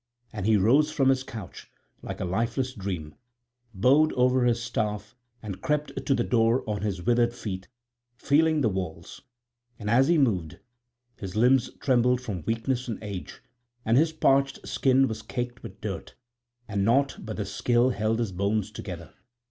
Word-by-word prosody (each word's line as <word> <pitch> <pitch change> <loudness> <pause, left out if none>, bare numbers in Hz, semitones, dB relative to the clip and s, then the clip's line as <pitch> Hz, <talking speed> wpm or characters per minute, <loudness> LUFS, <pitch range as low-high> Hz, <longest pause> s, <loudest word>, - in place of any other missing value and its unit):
And 105 -2 -3
he 110 -1 +5
rose 135 +10 +4
from 135 -3 +2
his 130 -1 +3
couch, 110 -8 -9 0.3
like - - -6
a - - -2
lifeless 115 +7 -1
dream, 90 -8 -5 0.6
bowed 135 +10 +4
over 125 0 +3
his 120 -1 +2
staff, 105 -2 -3 0.3
and 100 -3 -6
crept 150 0 -2
to 135 - +4
the 120 - +1
door 115 +1 +2
on 105 -2 -2
his 95 -4 -3
withered 120 +1 +2
feet, 95 -5 -6 0.5
feeling 155 +4 +2
the 115 - +3
walls; 90 -4 -5 0.6
and 105 0 -3
as 130 +3 +5
he 170 - +4
moved, 95 - +1 0.6
his 95 -3 -7
limbs 125 +3 +4
trembled 125 -2 +3
for 110 -7 -5
weakness 120 +3 -1
and 115 - -3
age; 100 -3 -7 0.4
and 115 - +3
his 155 +4 +4
parched 135 -3 +1
skin 135 0 +3
was 110 -2 -5
caked 120 +1 -5
with 95 +1 -11
dirt, 95 -2 -6 0.5
and 100 -2 -1
naught 135 +6 +2
but - - -6
the - - -2
skill 120 +1 +2
held 110 0 0
his 115 -4 -1
bones 100 +3 -1
together. 90 -5 -8
115 Hz, 165 wpm, -27 LUFS, 100-130 Hz, 0.6 s, he